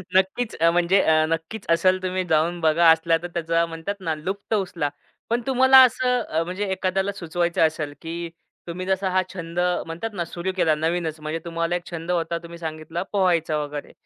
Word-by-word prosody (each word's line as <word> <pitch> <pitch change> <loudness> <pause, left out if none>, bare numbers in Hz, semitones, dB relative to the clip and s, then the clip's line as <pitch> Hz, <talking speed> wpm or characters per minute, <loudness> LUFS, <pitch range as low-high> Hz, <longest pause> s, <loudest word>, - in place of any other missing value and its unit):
नक्कीच. 190 +5 +1
अ, 165 - +6
म्हणजे 175 +3 +3 0.3
नक्कीच. 165 +6 -4
असेल 185 +3 +3
तुम्ही 185 0 -1
जाऊन 160 +3 +2
बघा, 160 +1 +4
असला 165 0 +3
तर - - -3
त्याचा 165 0 +1
म्हणतात 165 +4 -5
ना, 165 -4 -2
लुप्त 190 +8 -4
उचला. 180 -7 -1 0.4
पण 235 +2 +1
तुम्हाला 260 0 +7
असं 250 -9 +1
म्हणजे 185 +4 -3
एखाद्याला 190 +1 0
सुचवायचं 175 -3 -2
असेल, 155 -2 -5
की 170 +1 -5 0.4
तुम्ही 180 +2 -5
जसा 190 0 0
हा 185 0 +3
छंद 170 -2 -5 0.3
म्हणतात 170 +7 -5
ना, 175 -4 -3
सुरू 175 +3 -4
केला 160 -4 +3
नवीनच. 160 0 -2
म्हणजे 155 +2 -4
तुम्हाला 165 0 -1
एक 175 0 -4
छंद 170 +1 -4
होता, 170 -1 0
तुम्ही 170 0 -9
सांगितला 160 +1 -5
पोहायचा 175 -6 +2
वगैरे, 145 0 -7
170 Hz, 175 wpm, -23 LUFS, 165-190 Hz, 0.4 s, तुम्हाला